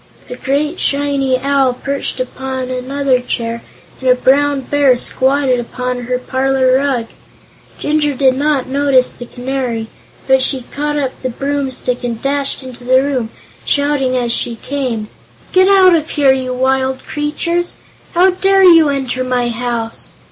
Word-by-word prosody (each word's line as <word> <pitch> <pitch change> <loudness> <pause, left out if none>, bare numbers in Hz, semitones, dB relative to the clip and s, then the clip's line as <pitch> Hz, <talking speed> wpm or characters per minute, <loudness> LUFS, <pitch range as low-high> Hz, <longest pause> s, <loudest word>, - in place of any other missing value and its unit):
A - - -4
great 295 +6 -1
shiny 280 -2 +1
Owl 275 -1 +2
perched 275 0 -4
upon 260 0 -4
another 260 +1 0
chair 235 -1 -3 0.4
and 260 - 0
a 250 - +6
Brown 280 +2 +2
Bear 275 -1 +2
squatted 260 0 +1
upon 250 +1 -4
her 250 +1 -1
parlor 260 0 +1
rug. 265 -4 0 0.7
Jinjur 295 -1 0
did 260 -1 +3
not 285 -1 +1
notice 270 -1 +2
the 245 - -10
Canary, 245 -3 -3 0.4
but 265 0 +4
she 260 -1 -1
caught 295 +1 -2
up 270 -3 -1
a 255 - -1
broomstick 265 -1 -3
and 235 -2 -3
dashed 275 +1 -2
into 250 -1 -10
the 260 +2 +3
room, 260 -5 -1 0.3
shouting 285 -3 +1
as 240 -1 0
she 235 0 -1
came: 245 -4 -3 0.5
"Get 370 0 +5
out 380 -2 +6
of 320 -1 +1
here, 280 -3 +3
you 260 -1 -3
wild 260 +1 0
creatures! 335 +4 -2 0.4
How 370 +2 +5
dare 385 +1 +3
you 330 -4 +7
enter 260 -2 -2
my 250 -1 0
house?" 235 -1 -4
265 Hz, 150 wpm, -16 LUFS, 250-285 Hz, 0.7 s, you